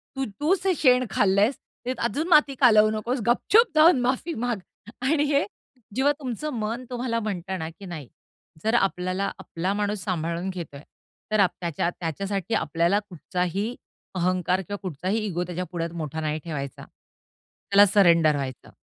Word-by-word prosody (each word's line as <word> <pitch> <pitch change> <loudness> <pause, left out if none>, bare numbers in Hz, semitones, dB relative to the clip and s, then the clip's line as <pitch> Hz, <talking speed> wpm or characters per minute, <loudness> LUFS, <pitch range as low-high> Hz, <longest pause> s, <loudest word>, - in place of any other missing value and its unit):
तू 270 - -1
तूच 365 +5 +1
हे 370 - +4
शेण 255 -3 +4
खाल्लेस, 205 +6 +3 0.3
ते 255 - 0
अजून 285 +8 -1
माती 300 -5 +5
कालवू 215 -4 +6
नकोस, 235 +4 -2
गपचूप 420 - +4
जाऊन 310 -3 +6
माफी 260 +7 -1
माग 235 -5 -1 0.5
आणि 300 -2 +3
हे 280 -7 +3 0.5
जेव्हा 275 +2 +3
तुमचं 270 +3 -4
मन 230 +4 -3
तुम्हाला 245 -2 -2
म्हणत 195 -4 -4
ना, 160 0 -4
की 195 +4 -13
नाही 155 -8 -7 0.6
जर 220 +1 +1
आपल्याला 190 -2 0
आपला 180 +4 -3
माणूस 205 -1 -2
सांभाळून 170 -1 -2
घेतोय, 165 -6 -7 0.5
तर 215 - +2
आप 190 -3 +5
त्याच्या 170 -1 -1
त्याच्यासाठी 195 +5 -3
आपल्याला 170 +6 +1
कुठचाही 180 - -2 0.4
अहंकार 185 +1 +1
किंवा 205 +3 -6
कुठचाही 185 +5 -2
इगो 180 -3 -2
त्याच्या 180 +1 -4
पुढ्यात 170 -1 -2
मोठा 160 -1 -4
नाही 155 0 -2
ठेवायचा. 140 -5 -6
त्याला 200 +1 -1
सरेंडर 170 -6 +5
व्हायचं, 135 -3 -5
200 Hz, 155 wpm, -25 LUFS, 170-245 Hz, 0.6 s, कालवू